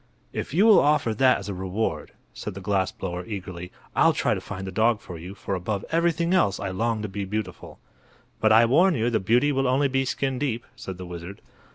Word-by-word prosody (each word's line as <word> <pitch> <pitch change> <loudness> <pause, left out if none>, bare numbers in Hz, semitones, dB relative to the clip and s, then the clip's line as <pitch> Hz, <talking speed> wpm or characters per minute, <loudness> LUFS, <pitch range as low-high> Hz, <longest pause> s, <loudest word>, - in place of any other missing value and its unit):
"If - - -4
you 185 +9 +4
will 220 -3 +8
offer 145 -6 +2
that 130 +3 +4
as - - -8
a 100 - -3
reward," 95 -4 -3 0.2
said 105 - -6
the - - -6
glass 95 -1 0
blower, 90 -1 -5
eagerly, 90 -4 -7 0.2
"I'll - - +5
try - - +1
to - - -3
find 95 -1 -7
the 95 - -5
dog 110 +3 +2
for 90 -4 -9
you, 90 +4 -9
for 100 - -5
above 95 +2 -3
everything 170 +1 +1
else 100 - +2
I 100 - -3
long 110 +3 -1
to - - -2
be 100 +1 -4
beautiful." 95 -2 -5 0.6
"But 110 - +3
I 115 +2 +7
warn 165 +9 +4
you 120 0 0
the 110 - +2
beauty 120 +9 +2
will 135 -1 +1
only 135 +3 +3
be 135 0 0
skin 135 0 -2
deep," 120 -5 -2
said 95 -2 -7
the 90 - -7
wizard. 90 +2 -8
110 Hz, 225 wpm, -25 LUFS, 95-130 Hz, 0.6 s, will